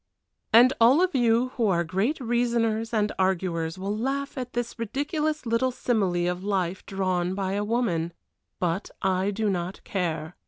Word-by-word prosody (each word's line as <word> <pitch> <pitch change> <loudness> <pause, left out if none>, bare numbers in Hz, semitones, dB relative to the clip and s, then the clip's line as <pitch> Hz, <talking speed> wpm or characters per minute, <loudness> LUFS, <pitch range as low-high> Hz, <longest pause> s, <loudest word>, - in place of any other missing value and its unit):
And 245 +4 +7
all 250 +7 +7
of 370 0 +2
you 240 0 +3
who 235 -3 0
are 175 -3 +2
great 195 - -1
reasoners 235 -2 0
and 215 -2 +1
arguers 175 -3 0
will 195 +2 -3
laugh 275 +5 -2
at 250 -2 -5
this 240 -1 -3
ridiculous 300 +6 -2
little 230 +3 +1
simile 200 -9 0
of 180 +1 -2
life 190 -3 -1
drawn 185 -2 -1
by 190 -1 -2
a 205 +1 0
woman; 205 -7 0 0.5
but 175 +2 -1
I 190 +1 +1
do 210 +2 -1
not 185 -1 -2
care. 165 -3 -3
210 Hz, 160 wpm, -26 LUFS, 185-240 Hz, 0.5 s, And